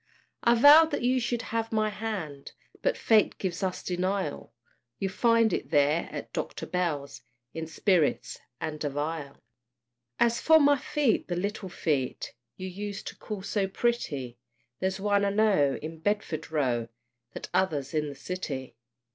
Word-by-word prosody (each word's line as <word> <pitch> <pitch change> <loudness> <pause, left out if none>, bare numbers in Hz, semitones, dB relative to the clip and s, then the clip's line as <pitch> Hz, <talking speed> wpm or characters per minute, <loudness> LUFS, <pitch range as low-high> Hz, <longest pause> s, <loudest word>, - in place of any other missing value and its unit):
I 235 0 +5
vowed 295 +6 +8
that 290 - -2
you 255 +1 +3
should 240 -1 -2
have 225 0 -1
my 215 -1 +1
hand, 190 -11 -5 0.3
But - - +1
fate 220 -2 +3
gives 180 -3 -3
us 185 -2 -2
denial; 185 - -2 0.5
You'll 195 -1 -2
find 230 0 +3
it - - -2
there, 145 +3 +2
at - - -7
Dr. - - -4
Bell's, 150 -6 -2 0.3
In 160 0 -5
spirits 170 -2 +1 0.2
and 155 -1 -4
a 145 - 0
phial. 145 0 -4 0.8
As 235 0 +3
for 320 -1 +6
my 285 -1 +5
feet, 280 -3 +1
the 175 - -2
little 200 +2 -3
feet 145 -7 -2 0.2
You 185 - -5
used 200 +2 -6
to - - -12
call 210 -3 -6
so 200 -1 0
pretty, 145 - -2 0.4
There's 190 +1 -1
one, 200 0 +2
I 200 - +2
know, 200 -10 +3
in 160 +1 -6
Bedford 190 -4 -2
Row, 125 -7 0 0.5
The - - -6
t'other's 160 -7 -1
in 150 -1 0
the 140 - -8
City. 140 -4 -5
185 Hz, 155 wpm, -28 LUFS, 150-220 Hz, 0.8 s, vowed